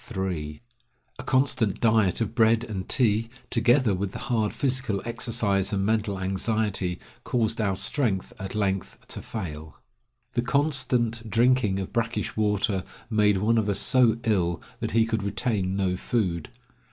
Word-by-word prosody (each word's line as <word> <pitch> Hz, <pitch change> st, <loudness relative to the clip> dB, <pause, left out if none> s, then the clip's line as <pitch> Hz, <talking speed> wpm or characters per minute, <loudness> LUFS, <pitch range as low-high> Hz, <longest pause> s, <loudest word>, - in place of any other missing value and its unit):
A 80 Hz, -6 st, -3 dB, 0.6 s
constant 130 Hz, -6 st, +1 dB
diet 110 Hz, -4 st, +3 dB
of 110 Hz, -1 st, -1 dB
bread 115 Hz, -1 st, +3 dB
and 100 Hz, -5 st, -5 dB
tea, 115 Hz, -3 st, +2 dB, 0.2 s
together 120 Hz, -1 st, +4 dB
with 95 Hz, +1 st, -3 dB
the -, -, -5 dB, 0.2 s
hard 110 Hz, -3 st, +1 dB
physical 130 Hz, -6 st, -1 dB
exercise 115 Hz, -4 st, 0 dB
and 100 Hz, -2 st, 0 dB
mental 105 Hz, -2 st, 0 dB
anxiety, 95 Hz, -1 st, -1 dB, 0.2 s
caused 115 Hz, -2 st, 0 dB
our 100 Hz, -3 st, +1 dB
strength 100 Hz, -3 st, -1 dB
at 95 Hz, +1 st, -6 dB
length 95 Hz, -3 st, -1 dB
to -, -, -5 dB
fail. 80 Hz, -7 st, -7 dB, 0.6 s
The 120 Hz, -, +1 dB
constant 125 Hz, -4 st, +1 dB
drinking 115 Hz, -3 st, +3 dB
of 95 Hz, -1 st, -5 dB
brackish 115 Hz, 0 st, -1 dB
water 105 Hz, -3 st, +1 dB, 0.3 s
made 105 Hz, -2 st, +3 dB
one 110 Hz, +4 st, +2 dB
of 105 Hz, -1 st, -1 dB
us 100 Hz, -, +3 dB
so 125 Hz, -3 st, +4 dB
ill 90 Hz, -7 st, +1 dB, 0.2 s
that -, -, -2 dB
he 115 Hz, 0 st, +4 dB
could 110 Hz, -1 st, -1 dB
retain 100 Hz, -2 st, -1 dB
no 95 Hz, -2 st, 0 dB
food. 90 Hz, -5 st, -1 dB
110 Hz, 145 wpm, -26 LUFS, 95-115 Hz, 0.6 s, together